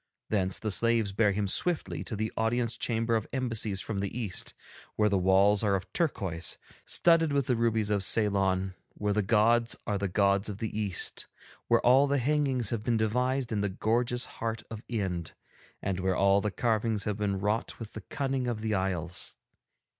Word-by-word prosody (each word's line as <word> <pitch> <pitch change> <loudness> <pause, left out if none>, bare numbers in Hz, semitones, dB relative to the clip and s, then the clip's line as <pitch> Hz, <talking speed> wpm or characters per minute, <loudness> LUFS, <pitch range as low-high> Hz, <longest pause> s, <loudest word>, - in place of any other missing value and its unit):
Thence 95 -3 +1
the 110 - -3
slaves 115 -1 +2
bear 105 +1 +2
him 100 0 -1
swiftly 175 - 0
to 115 - -4
the 110 +1 -3
Audience 115 +1 0
Chamber 115 0 0
of 110 -1 -1
Embassies 115 -6 -1
from 110 -3 -3
the 100 0 -1
East, 105 -7 -4 0.4
where 105 0 +3
the 100 -2 +2
walls 95 +3 +4
are 100 -2 +2
of 95 - -5
turquoise, 95 - -1 0.3
studded 165 -2 +3
with 140 -2 +1
the 125 - +1
rubies 110 -2 +1
of 100 -2 +1
Ceylon, 95 -3 +1 0.2
where 105 0 -1
the 105 - +2
gods 115 +3 +3
are 100 -1 -1
the 100 - -1
gods 100 +1 +2
of 100 - -5
the 110 0 -4
East, 105 -5 -3 0.4
where - - +4
all 130 +4 +6
the 140 0 +1
hangings 135 -4 +1
have 115 -3 -1
been 115 0 +1
devised 125 +4 0
in 105 -2 0
the 105 - 0
gorgeous 120 +5 0
heart 115 0 -4
of 110 -1 -6
Ind, 95 -7 -3 0.5
and 95 -2 -1
where 95 0 0
all 100 +1 +4
the 105 - 0
carvings 110 -1 0
have 105 -1 -2
been 100 -2 -1
wrought 105 +3 -1
with 115 -2 -9
the 110 - -7
cunning 135 +2 -2
of 115 -3 -2
the 110 -1 -1
isles. 90 -3 -1
110 Hz, 190 wpm, -29 LUFS, 100-120 Hz, 0.5 s, all